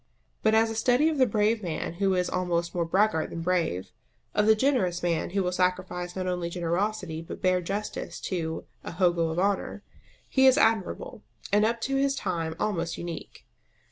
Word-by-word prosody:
But 220 0 +3
as 225 0 +3
a - - -5
study 250 +7 +3
of 305 -3 -2
the 255 - +5
brave 215 +1 +1
man 165 -3 -3
who 195 -1 +3
is 180 -1 +1
almost 175 -2 -1
more 170 -1 0
braggart 190 -1 +2
than 165 - -5
brave, 165 - 0 0.4
of 210 0 +2
the 220 - +7
generous 215 -9 +1
man 170 -2 0
who 195 +2 0
will 180 - 0
sacrifice 180 -1 -1
not 185 -1 -2
only 180 -2 -2
generosity 175 0 -2
but 165 - -9
bare 185 -1 +3
justice 200 +4 -4
to 160 -4 -3 0.2
"a - - -6
hogo 175 -2 +2
of 160 - -4
honour," 200 +2 0 0.4
he 265 -1 +4
is 260 +1 +6
admirable, 225 - +1 0.3
and 210 +1 +5
up 230 +1 0
to 270 +3 0
his 275 0 +2
time 170 -9 -2
almost 170 -6 -1
unique. 170 -2 -7
185 Hz, 185 wpm, -27 LUFS, 170-215 Hz, 0.4 s, the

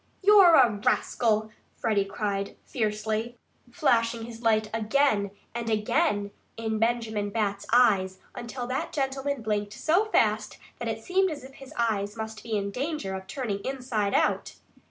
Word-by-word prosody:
"You're 390 -4 +8
a 250 -5 +6
rascal!" 220 -2 +1 0.2
Freddie 210 -3 +1
cried 200 0 -3
fiercely, 220 0 -2 0.3
flashing 230 -1 +1
his 230 0 -10
light 220 -2 +2
again 215 -2 +2 0.2
and 235 -1 -3
again 210 -1 +1 0.3
in 220 -1 -2
Benjamin 225 -3 0
Bat's 200 -2 -2
eyes, 195 -6 +4 0.2
until 245 +1 -6
that 255 +2 -3
gentleman 270 -2 -2
blinked 205 -1 -1
so 355 +7 +2
fast 430 - +1 0.2
that 235 - -3
it 225 0 -3
seemed 380 +1 +2
as 295 -5 -6
if 265 +1 -12
his 270 +1 -13
eyes 210 -2 0
must 220 0 -6
be 225 -2 -2
in 200 0 -2
danger 270 -5 -3
of 190 0 -6
turning 210 -3 -3
inside 250 -6 -1
out. - - +1
225 Hz, 150 wpm, -27 LUFS, 210-260 Hz, 0.3 s, You're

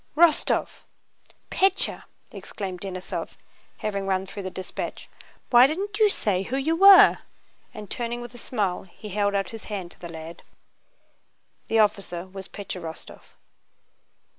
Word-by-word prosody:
"Wostóv! 335 -2 +3 0.7
Pétya!" 385 0 +1 0.3
exclaimed 185 -3 -6
Denísov, 185 -2 -5 0.5
having 200 -2 -2
run 190 0 0
through 200 +1 -8
the 185 - -4
dispatch. 185 0 -6 0.4
"Why 245 +1 +8
didn't 400 +8 -4
you 430 -1 +6
say 200 - 0
who 245 +7 -3
you 310 +4 +1
were?" 390 +2 +8 0.5
and 210 -1 -9
turning 240 +2 -2
with 240 0 -9
a 245 - -11
smile 205 -7 -1
he 210 +4 -11
held 200 0 0
out 195 -2 -1
his 225 -1 -9
hand 190 -5 -5
to - - -19
the 170 - -8
lad. 165 0 -9 1.3
The 225 - +1
officer 200 -5 +1
was 190 0 -10
Pétya 195 -3 -7
Rostóv. 160 -1 -9
205 Hz, 140 wpm, -25 LUFS, 185-245 Hz, 1.3 s, Why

